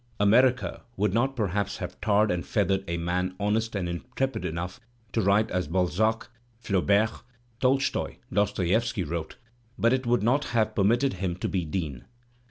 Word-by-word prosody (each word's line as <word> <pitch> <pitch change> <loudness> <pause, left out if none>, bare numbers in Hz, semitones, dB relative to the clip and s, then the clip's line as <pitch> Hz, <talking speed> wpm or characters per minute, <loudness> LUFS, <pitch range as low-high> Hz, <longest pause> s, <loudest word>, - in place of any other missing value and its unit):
America 125 +5 +3 0.2
would 100 0 +1
not 130 +4 +1
perhaps 100 -3 -1
have 90 -2 -7
tarred 105 0 +3
and 90 -1 -1
feathered 95 -1 +1
a 85 - -2
man 90 +2 -1
honest 110 +2 0
and 95 -3 -1
intrepid 125 +10 -3
enough 90 +3 -4 0.3
to 115 - +2
write 105 +2 +3
as 90 -4 -1
Balzac, 95 +6 +1 0.3
Flau 100 -5 0
bert, 105 +3 +2 0.4
Tolstoy, 135 +1 +1 0.2
Dostoievski 100 +2 +1
wrote, 85 +1 -4 0.4
but 115 +2 +3
it 130 -1 -1
would 120 -2 +2
not 130 +6 +2
have 110 -2 +1
permitted 120 +7 +2
him 90 -2 -2
to 90 - -3
be 90 -4 -1
Dean. 75 -6 -4
100 Hz, 160 wpm, -27 LUFS, 90-115 Hz, 0.4 s, America